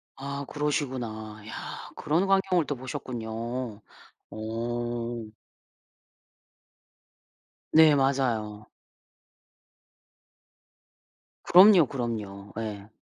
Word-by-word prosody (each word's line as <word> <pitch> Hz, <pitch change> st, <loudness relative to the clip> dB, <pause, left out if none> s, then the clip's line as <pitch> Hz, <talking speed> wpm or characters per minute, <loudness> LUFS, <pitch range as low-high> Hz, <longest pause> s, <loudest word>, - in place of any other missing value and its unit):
아 140 Hz, +1 st, -5 dB
그러시구나. 125 Hz, -8 st, -3 dB
야 -, -, -7 dB
그런 170 Hz, +6 st, +1 dB
광경을 190 Hz, -3 st, +3 dB
또 145 Hz, -, -2 dB
보셨군요. 120 Hz, -2 st, -5 dB, 0.5 s
어. 120 Hz, +1 st, -4 dB, 2.4 s
네 160 Hz, -1 st, +7 dB
맞아요. 120 Hz, -6 st, 0 dB, 2.8 s
그럼요, 185 Hz, -3 st, +8 dB
그럼요. 105 Hz, -6 st, -5 dB
예. 105 Hz, -2 st, -5 dB
120 Hz, 135 characters per minute, -27 LUFS, 110-140 Hz, 2.8 s, 그럼요